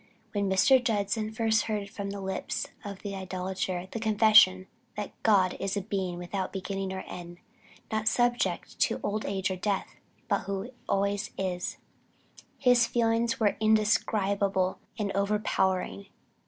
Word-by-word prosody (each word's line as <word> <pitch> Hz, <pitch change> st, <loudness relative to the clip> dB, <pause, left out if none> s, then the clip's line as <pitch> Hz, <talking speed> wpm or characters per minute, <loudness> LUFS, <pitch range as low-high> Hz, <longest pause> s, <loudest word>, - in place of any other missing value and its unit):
When 200 Hz, -2 st, 0 dB
Mr. 250 Hz, +7 st, +5 dB
Judson 215 Hz, -1 st, 0 dB
first 220 Hz, -1 st, +1 dB
heard 210 Hz, -2 st, -2 dB
from 200 Hz, -1 st, -5 dB
the 200 Hz, 0 st, -5 dB
lips 190 Hz, 0 st, -3 dB, 0.2 s
of 200 Hz, 0 st, -8 dB
an 200 Hz, -, -3 dB
idolater 185 Hz, -1 st, -3 dB
the 230 Hz, -, -4 dB
confession 215 Hz, -4 st, +6 dB, 0.3 s
that 210 Hz, -1 st, -4 dB
"God 195 Hz, -4 st, +4 dB
is 195 Hz, +1 st, -1 dB
a -, -, 0 dB
Being 190 Hz, -3 st, -3 dB
without 185 Hz, +2 st, -3 dB
beginning 195 Hz, 0 st, -3 dB
or 190 Hz, 0 st, -4 dB
end, 175 Hz, -1 st, -9 dB, 0.5 s
not 220 Hz, 0 st, -1 dB
subject 240 Hz, +2 st, +1 dB
to -, -, +2 dB
old 210 Hz, +1 st, -1 dB
age 195 Hz, -1 st, -1 dB
or 185 Hz, -, -3 dB
death, 200 Hz, +1 st, -2 dB, 0.3 s
but -, -, 0 dB
who 200 Hz, +5 st, -4 dB, 0.2 s
always 200 Hz, +1 st, 0 dB
is," 180 Hz, -2 st, -2 dB, 0.8 s
his 245 Hz, -2 st, +4 dB
feelings 230 Hz, +1 st, +1 dB
were 210 Hz, -3 st, +3 dB
indescribable 200 Hz, -3 st, +2 dB, 0.2 s
and 205 Hz, -3 st, -1 dB
overpowering. 200 Hz, -1 st, 0 dB
200 Hz, 140 wpm, -29 LUFS, 190-220 Hz, 0.8 s, confession